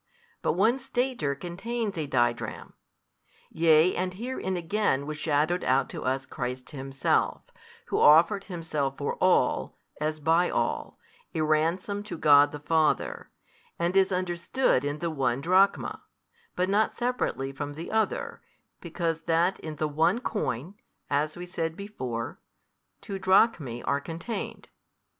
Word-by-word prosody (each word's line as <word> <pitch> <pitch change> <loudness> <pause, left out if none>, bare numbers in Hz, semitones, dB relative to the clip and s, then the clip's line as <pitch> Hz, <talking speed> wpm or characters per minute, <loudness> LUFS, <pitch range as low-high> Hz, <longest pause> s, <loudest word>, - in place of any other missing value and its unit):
But - - +1
one 225 +8 +3
stater 250 - -1
contains 200 +7 -4
a 155 -3 -3
didrachm. 120 -3 -1 0.8
Yea 160 +2 +4
and 185 0 -2
herein 215 -4 -3
again 170 -5 0
was 150 0 -5
shadowed 155 +3 +1
out 130 +2 +2
to - - -6
us 130 +1 -1
Christ 125 +2 -5
Himself, 135 -2 0 0.5
Who - - 0
offered 170 +7 +6
Himself 155 -7 -3
for 145 - -2
all, - - +2 0.2
as 155 +1 -2
by 165 +4 +3
all, - - -2 0.4
a 160 - 0
Ransom 165 +6 +1
to 210 -3 -7
God 145 -1 +6
the 150 - -6
Father, 155 +1 0 0.5
and 170 +2 0
is 195 0 +4
understood 180 - +1
in 145 +1 -2
the 170 +1 -2
one 130 -4 0
drachma, 185 +6 +2 0.5
but 180 - +1
not 205 +3 +2
separately 240 - -1
from 145 +1 -5
the 160 +3 -7
other, 470 - -1 0.4
because 165 -2 -2
that 170 +3 +2
in 155 -1 -6
the 155 +1 -1
one 155 +8 +2
coin, 175 - -3 0.4
as 150 +3 0
we 175 - -6
said 165 -2 -3
before, 130 - -5 0.6
two 195 -1 -5
drachmae 185 - +2
are 140 0 0
contained. 170 +9 -6
165 Hz, 140 wpm, -27 LUFS, 145-190 Hz, 0.8 s, offered